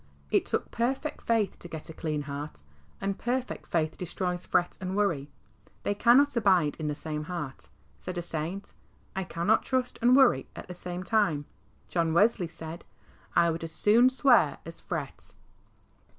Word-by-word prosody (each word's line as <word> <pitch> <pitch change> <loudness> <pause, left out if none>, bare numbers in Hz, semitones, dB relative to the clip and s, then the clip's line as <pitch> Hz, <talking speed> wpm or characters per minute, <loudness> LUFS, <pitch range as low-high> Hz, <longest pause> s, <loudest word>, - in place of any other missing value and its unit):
It - - +2
took - - -2
perfect 265 +6 -1
faith 225 -3 0
to - - -9
get 160 -2 -7
a - - -10
clean 155 -2 -2
heart, 145 - -7 0.4
and 195 0 -2
perfect 250 +1 -2
faith 155 -2 -1
destroys 180 0 -3
fret 175 - +1
and 185 0 -3
worry. 165 -9 0 0.5
They 205 - +1
cannot 250 +7 +5
abide 185 -9 +3
in 155 - -2
the 150 - -1
same 150 0 -4
heart. 150 -6 -6 0.3
Said 180 -1 -6
a 175 - -2
saint, 170 +4 -4 0.2
" - - -34
I 190 - -1
cannot 175 +5 +1
trust 255 -1 -1
and 245 +2 +6
worry 265 -2 +5
at - - -8
the 180 - -6
same 180 0 -6
time." 185 -8 +1 0.4
John 165 -2 0
Wesley 205 -2 +4
said, 165 0 -8 0.3
" - - -29
I 170 0 +5
would 165 +1 -4
as 165 -1 -6
soon 235 +5 +5
swear 260 -1 +4
as - - -7
fret." - - -5
180 Hz, 175 wpm, -28 LUFS, 160-225 Hz, 0.5 s, and